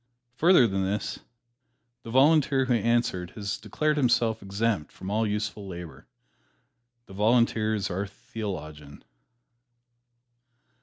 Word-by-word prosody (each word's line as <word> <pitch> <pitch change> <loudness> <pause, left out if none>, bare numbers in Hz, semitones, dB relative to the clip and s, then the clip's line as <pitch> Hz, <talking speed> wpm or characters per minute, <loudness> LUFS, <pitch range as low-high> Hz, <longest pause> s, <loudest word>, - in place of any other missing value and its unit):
Further 175 -5 +6
than 95 -3 0
this, 100 +2 -2 0.8
the 115 - -10
Volunteer 135 +1 +4
who 125 - +1
answered 115 -6 0
has 100 -2 -4
declared 150 +9 -1
himself 120 -4 +2
exempt 100 -4 -1
from 95 - -7
all 110 +1 +1
useful 105 -1 -3
labor. 85 -3 -9 1.0
This 95 - -13
Volunteer 110 0 +2
is 100 - -2
our 95 +3 -2
theologian. 80 -9 -8
105 Hz, 110 wpm, -27 LUFS, 95-120 Hz, 1.0 s, Further